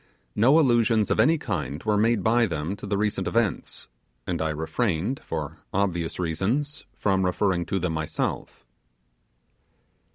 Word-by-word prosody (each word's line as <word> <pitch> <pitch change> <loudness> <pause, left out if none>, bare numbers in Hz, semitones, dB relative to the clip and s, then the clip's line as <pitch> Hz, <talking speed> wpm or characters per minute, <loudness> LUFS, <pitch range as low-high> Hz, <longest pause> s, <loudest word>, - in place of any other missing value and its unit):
No 130 +8 +5
allusions 115 -6 +3
of - - +1
any 165 +1 +5
kind 80 - -4
were 105 -1 +1
made 110 -1 +2
by 115 +1 +3
them 80 +2 -3
to 105 - -8
the 100 0 0
recent 105 0 -1
events; 115 -5 -1 0.4
and - - -2
I 80 - 0
refrained, 85 - -1
for 80 0 -5
obvious 85 -4 -1
reasons, 105 - -2
from 95 -2 +1
referring 90 -1 0
to 95 - -1
them 90 -3 -1
myself. 80 -1 -3
100 Hz, 140 wpm, -25 LUFS, 80-115 Hz, 0.4 s, No